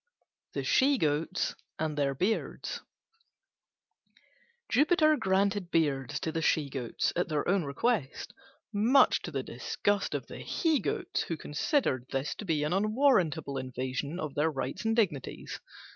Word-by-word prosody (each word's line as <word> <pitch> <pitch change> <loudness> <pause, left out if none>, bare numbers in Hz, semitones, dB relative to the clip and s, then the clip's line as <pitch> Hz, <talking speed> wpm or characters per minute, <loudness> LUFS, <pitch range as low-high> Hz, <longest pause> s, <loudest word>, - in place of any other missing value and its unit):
THE - - -2
SHE 275 +1 +4
GOATS 160 +1 0 0.2
AND 155 -1 -2
THEIR 140 -2 0
BEARDS 195 +11 -2 1.9
Jupiter 310 +2 +4
granted 195 -4 +1
beards 140 -7 0
to 160 - -2
the 165 - -2
She 150 -3 +1
Goats 125 -4 -1
at 175 0 0
their 150 -2 -1
own 190 -3 +2
request, 145 - -1 0.4
much 230 +7 +4
to - - -5
the 135 -5 -3
disgust 195 +13 -1
of - - -3
the - - -9
he 320 -4 +1
Goats, - - -2
who 165 - -3
considered 150 - 0
this 135 +2 -2
to 210 - -6
be 155 -5 +1
an 150 +3 0
unwarrantable 195 - +2
invasion 130 +5 -4
of 155 -5 -4
their 150 +2 +2
rights 135 - -4
and 225 0 +2
dignities. 180 - -1
160 Hz, 145 wpm, -30 LUFS, 140-210 Hz, 1.9 s, SHE